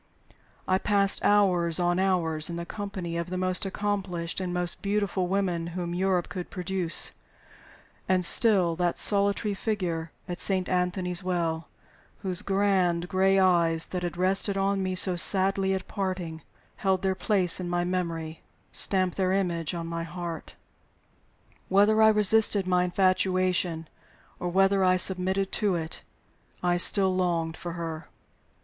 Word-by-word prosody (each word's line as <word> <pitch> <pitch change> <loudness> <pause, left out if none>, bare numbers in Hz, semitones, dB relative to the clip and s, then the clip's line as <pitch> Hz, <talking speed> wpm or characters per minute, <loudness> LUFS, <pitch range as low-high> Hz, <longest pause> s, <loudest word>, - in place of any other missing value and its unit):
I 185 0 +2
passed 200 -1 +1
hours 180 -5 +2
on 175 0 +1
hours 165 -5 0
in 170 - -5
the 170 0 -5
company 190 -4 -6
of 170 +1 -4
the 185 - -4
most 185 +1 +1
accomplished 190 -4 -3
and 185 -1 -3
most 175 -1 -1
beautiful 200 -2 -1
women 180 -3 -1
whom 175 -1 -4
Europe 185 -1 0
could 180 -3 -7
produce 180 -2 0 1.0
and 185 -1 +3
still 185 -4 +4
that 175 -1 -1
solitary 200 +1 +2
figure 180 -6 -3 0.2
at 175 0 -5
Saint 190 -2 +3
Anthony's 180 0 0
Well, 170 -3 -2 0.6
those 185 -2 +3
grand 190 -3 0
gray 190 +1 +2
eyes 170 -3 +2
that 180 - -5
had 175 0 -4
rested 195 +2 0
on 195 0 0
me 185 -1 -2
so 185 0 +3
sadly 190 +2 +1
at 190 - -6
parting, 185 -5 -4 0.4
held 190 -2 0
their 190 0 +1
place 190 -2 +2
in 180 -1 -4
my 175 0 0
memory, 170 -3 -4 0.3
stamped 185 -2 +2
their 185 -1 +1
image 175 -4 -2
on 170 -1 -5
my 165 0 -4
heart. 170 -1 -7 1.1
Whether 205 +3 +4
I 220 - +7
resisted 210 -1 +3
my 180 -1 +1
infatuation, 185 -2 0 0.5
or 175 - -3
whether 195 +2 +2
I 185 0 +3
submitted 190 +1 0
to 200 -4 +1
it, 160 -1 -4 0.6
I 175 0 +2
still 190 +1 +4
longed 170 -3 -1
for 175 0 -7
her. 165 -2 -6
185 Hz, 145 wpm, -26 LUFS, 175-195 Hz, 1.1 s, I